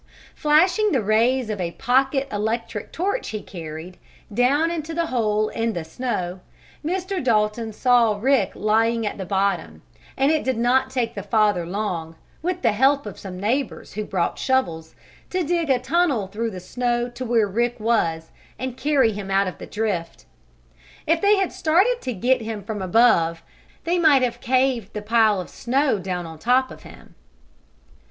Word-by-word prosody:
Flashing 355 +7 +3
the 255 -5 +1
rays 225 +3 +2
of 205 -3 -3
a 170 -1 -3
pocket 270 +3 +1
electric 215 0 -3
torch 400 +8 -2
he 215 - -4
carried, 165 0 -8 0.4
down 280 +8 +2
into 325 -1 -4
the 335 0 0
hole 215 -6 0
in 230 0 -2
the 170 - -4
snow, 180 -1 -3 0.4
Mr. 370 +2 -2
Dalton 220 -1 +1
saw 235 -2 +3
Rick 245 -5 +2
lying 225 +2 +1
at 210 - -4
the 190 - -5
bottom, 190 - -1 0.3
and 275 +3 +3
it 315 - +1
did 260 -3 -1
not 255 +3 +2
take 250 -3 -1
the 200 - -5
father 205 -4 +1
long, 175 -4 -3 0.3
with 360 +2 -3
the - - +4
help 270 +6 +2
of 205 - -8
some 185 -2 -8
neighbors 240 +6 -2
who 215 - -3
brought 185 -4 -2
shovels, 170 -12 -1 0.3
to 370 -1 -1
dig 335 -1 -1
a 265 - +4
tunnel 290 - +1
through 215 +4 -3
the 185 -4 -7
snow 240 +5 -1
to 245 +1 -7
where 230 -3 +2
Rick 235 +4 -1
was 170 -8 0 0.3
and 255 -1 -5
carry 280 -6 +2
him 200 -2 -6
out 195 +1 +3
of 185 - -6
the - - -8
drift. 200 -6 -3 0.8
If 330 +1 +2
they 410 +1 +5
had 390 -2 0
started 385 +10 +2
to 255 - -3
get 245 +5 +1
him 220 -2 -5
from 205 0 -5
above 175 -5 +3 0.4
they 350 +1 +1
might 295 -6 +5
have 245 -2 -2
caved 255 -4 +1
the 210 - -5
pile 220 -2 +3
of 180 - -5
snow 260 -1 0
down 180 -2 -4
on 160 -1 -10
top 255 +6 +2
of - - -11
him. - - -15
230 Hz, 175 wpm, -23 LUFS, 200-270 Hz, 0.8 s, they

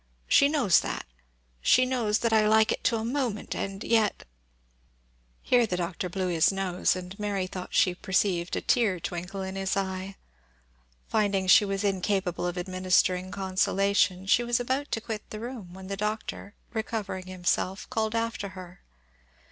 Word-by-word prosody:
She 280 - +5
knows 270 - +4
that - - -4
and - - -36 0.5
she 255 - +6
knows 235 -5 +1
that 230 -1 +1
I 215 -1 +4
like 220 0 +4
it - - -3
to - - +3
a 220 0 -2
moment 240 -4 -2
and 195 +1 -4
yet 225 -2 +1 0.6
" - - -38
Here 245 -2 +3
the 180 - -2
Doctor 180 +1 -3
blew 185 +1 -2
his 170 0 +3
nose, 190 -2 0
and 185 +2 -8
Mary 200 -2 -1
thought 185 0 -7
she 180 - +4
perceived 180 -2 0
a - - -2
tear 215 -7 +2
twinkle 180 +3 -5
in 190 0 -5
his 195 0 -1
eye. 190 0 -3 0.9
Finding 200 -3 +1
she 195 +3 +7
was 195 0 -2
incapable 190 -2 0
of 175 +1 -4
administering 185 0 +1
consolation, 190 0 +1
she 235 +5 +3
was 240 0 +1
about 260 +4 -1
to 225 - -1
quit 220 -1 -6
the 215 - -6
room, 230 -6 -7
when 190 0 -10
the 195 +1 -4
Doctor, 210 0 -4 0.2
recovering 210 -4 -3
himself, 185 +1 -1
called 220 0 -1
after 230 -3 -2
her. 185 -1 -11
195 Hz, 170 wpm, -27 LUFS, 185-220 Hz, 0.9 s, she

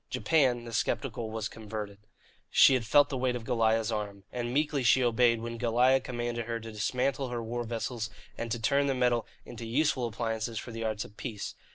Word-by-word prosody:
Japan 130 -7 +2
the 115 - -8
sceptical 115 0 -1
was 110 -1 -3
converted. 105 -2 -7 0.5
She - - +7
had 120 -4 0
felt 145 +4 +5
the 135 - -3
weight 125 -1 +1
of 120 - -5
Goliah's 115 -2 +1
arm. 100 -2 -4
And 120 -1 -3
meekly 145 +1 +1
she 125 +2 +4
obeyed 120 -1 +3
when 115 0 -5
Goliah 125 +3 +4
commanded 120 -2 -3
her 115 -1 -2
to 115 0 -8
dismantle 125 +5 -1
her 120 -1 -3
war 120 +2 -3
vessels 115 0 -3 0.3
and 115 -1 -5
to 120 - -1
turn 140 +5 +2
the 135 - +1
metal 120 -2 +1 0.2
into 120 0 -8
useful 125 +1 +1
appliances 115 0 -3
for 120 - -5
the 115 0 -5
arts 110 -1 -2
of 105 - -16
peace. 110 -6 -5
120 Hz, 200 wpm, -30 LUFS, 110-125 Hz, 0.5 s, She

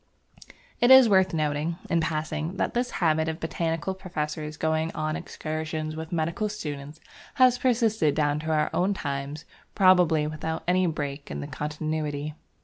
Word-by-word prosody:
It 240 - +4
is 260 -2 +9
worth 190 -3 +4
noting, 155 +1 -1
in 170 -2 +1
passing, 155 +2 -2
that - - -1
this 245 +1 0 0.2
habit 160 0 +2
of 160 +1 -4
botanical 165 +2 -2
professors 155 -5 -5
going 160 +1 0
on 155 0 -1
excursions 155 -2 -4
with 160 +1 -6
medical 170 +5 -1
students 150 -7 -6 0.4
has 255 -2 +5
persisted 225 - +2
down 145 -1 +1
to 155 +1 -5
our 150 -1 +1
own 195 +3 +1
times, 140 -1 -4 0.3
probably 180 -6 +5
without 155 +1 -4
any 180 0 +3
break 145 -3 -4
in - - -5
the - - -4
continuity. 150 0 -3
160 Hz, 150 wpm, -26 LUFS, 150-180 Hz, 0.4 s, is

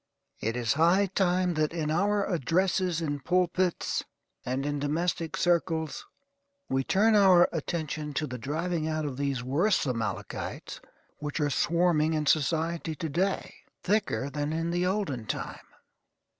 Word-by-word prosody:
It 115 +2 -2
is 120 +1 +1
high 170 +6 +4
time 180 -1 +2
that 155 0 0
in 155 -3 -1
our 200 +4 +2
addresses 180 +1 +1
in 145 -3 -2
pulpits, 180 +2 0 0.4
and 130 +2 -2
in 145 0 -1
domestic 165 +3 -1
circles, 165 -3 0 0.6
we 135 0 0
turn 210 +9 +3
our 190 -4 +6
attention 155 -2 -3
to 155 - 0
the 125 -3 -6
driving 160 +5 -2
out 155 -1 -1
of 140 -3 -3
these 140 -3 -1
worse 160 +11 +2
Amalekites 115 -5 -4 0.4
which 150 +2 -4
are 145 -1 +1
swarming 165 0 +2
in 155 -1 -1
society 160 +3 +1
to 160 +1 -4
day, 190 +6 -1 0.3
thicker 190 -8 0
than 145 +1 -2
in 165 +1 -1
the 175 +1 +1
olden 165 - -2
time. - - -5
160 Hz, 145 wpm, -28 LUFS, 145-180 Hz, 0.6 s, our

